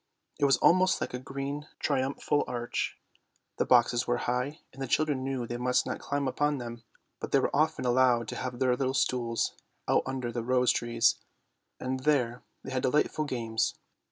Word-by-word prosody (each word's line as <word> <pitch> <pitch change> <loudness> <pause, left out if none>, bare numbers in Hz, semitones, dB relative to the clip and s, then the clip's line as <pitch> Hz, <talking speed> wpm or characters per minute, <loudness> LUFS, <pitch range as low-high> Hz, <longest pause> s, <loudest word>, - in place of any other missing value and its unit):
It 145 - +3
was 135 - +5
almost 185 +1 +4
like - - -4
a 125 - -3
green 140 +3 -5
triumphal 140 +1 0
arch. 120 -1 -3 0.6
The - - 0
boxes 120 -1 +4
were 120 - +2
high, 125 +6 -1
and 135 - -11
the 135 - -2
children 145 0 +1
knew 135 -2 -2
they 120 +1 -4
must 125 +1 +1
not - - -3
climb 140 -1 -2
up 130 - -5
on 145 0 +3
to 125 - -5
them, 120 0 -8 0.4
but - - -5
they - - +5
were - - 0
often - - +1
allowed 125 -2 +3
to - - -5
have 125 -1 -4
their 125 0 +2
little 130 +1 -1
stools 120 -2 0 0.3
out - - +4
under 130 -2 -3
the 120 - -3
rose 125 +1 +3
trees, 115 -1 +2 0.6
and 130 +1 -2
there 130 -4 +1 0.2
they 135 - -7
had 130 -1 0
delightful 150 +3 +1
games. 115 -5 -1
130 Hz, 190 wpm, -29 LUFS, 120-135 Hz, 0.6 s, was